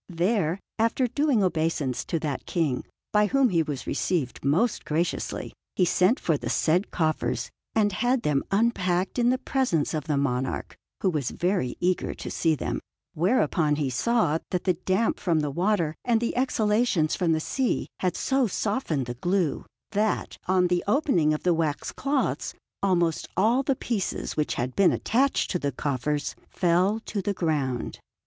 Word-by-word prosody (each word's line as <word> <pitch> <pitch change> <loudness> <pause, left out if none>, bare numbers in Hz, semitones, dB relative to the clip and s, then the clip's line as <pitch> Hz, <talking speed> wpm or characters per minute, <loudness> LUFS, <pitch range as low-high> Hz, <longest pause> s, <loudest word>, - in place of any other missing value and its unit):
There, 180 0 0 0.2
after 230 +3 +2
doing 270 -3 +2
obeisance 160 -7 0
to 165 - -1
that 145 -4 -3
King, 155 -8 0 0.3
by 210 0 +4
whom 270 +1 +3
he 170 -3 +2
was 145 -4 -4
received 155 -9 -1
most 175 - +1
graciously, 165 +3 -2 0.2
he 185 - +3
sent 185 +8 +3
for 160 -3 +1
the - - -4
said 175 +5 +2
coffers 155 -2 -1 0.2
and 210 -2 +3
had 245 +5 +1
them 145 -5 +1
unpacked 195 -2 +1
in 240 0 +4
the 255 - +2
presence 255 - 0
of 155 -2 -2
the 150 -3 0
monarch, 130 -2 -1 0.3
who 190 - +2
was 145 -6 -1
very 175 -9 -1
eager 180 0 0
to - - -7
see 160 -2 +2
them; - - -3 0.3
whereupon 170 -4 +2
he 145 -3 -1
saw 165 - +1
that 180 - -1
the 185 - +3
damp 190 +6 0
from 165 -5 +1
the 150 -1 -2
water 175 -1 +1
and 235 -2 +2
the 235 - -2
exhalations 215 -9 +2
from 170 -3 +1
the 160 - +1
sea 255 +10 -1
had 180 -3 0
so 265 -2 +2
softened 200 - -1
the 120 - -4
glue, 175 +4 -1 0.2
that, 210 +1 0
on 185 0 +3
the 175 0 +1
opening 205 - +3
of 150 - -2
the 180 - +3
waxed 160 -3 -2
cloths, 275 0 -1 0.3
almost 175 -4 +1
all 225 +7 +4
the 275 0 0
pieces 225 -6 -3
which 150 - 0
had 125 +1 -3
been 195 -2 +5
attached 265 +5 +1
to 180 - 0
the 140 -2 -1
coffers 145 +2 -2
fell 185 +5 +2
to 205 -3 -4
the 200 +2 -1
ground. 145 -8 -1
180 Hz, 170 wpm, -26 LUFS, 155-220 Hz, 0.3 s, been